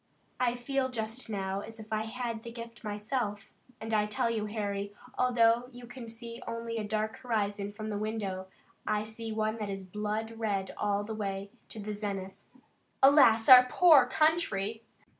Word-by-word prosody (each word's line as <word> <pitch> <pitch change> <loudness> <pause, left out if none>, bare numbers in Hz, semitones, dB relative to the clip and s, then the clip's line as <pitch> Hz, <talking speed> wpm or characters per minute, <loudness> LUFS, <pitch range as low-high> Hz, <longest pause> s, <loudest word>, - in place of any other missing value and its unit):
I 245 -1 +2
feel 260 +2 -1
just 225 0 -4
now 195 -2 -2
as 225 +2 -9
if 220 0 -7
I 215 0 0
had 230 -1 -4
the 235 - -8
gift 230 0 -9
myself, 210 0 -3 0.3
and 220 0 -5
I 210 -1 +3
tell 210 +2 0
you, 215 -2 -1
Harry, 205 -1 -3 0.2
although 240 -1 +3
you 245 -1 -11
can 240 -1 -9
see 230 +1 -8
only 230 0 -4
a - - -2
dark 215 +1 -2
horizon 205 -4 -2
from 215 +1 -6
the 205 - -2
window, 205 -3 -3 0.4
I 210 0 +1
see 220 +1 -7
one 215 0 -1
that 210 -1 -3
is 195 -1 -5
blood 215 +3 -3
red 200 -4 -1
all 205 0 0
the 220 +2 -5
way 200 -2 -4 0.2
to 220 - -8
the 210 0 -4
zenith. 200 -2 -4 0.7
Alas, 260 -6 +7
our 250 -1 +10
poor 305 -7 +7
country!" 250 - +1
220 Hz, 175 wpm, -30 LUFS, 205-235 Hz, 0.7 s, our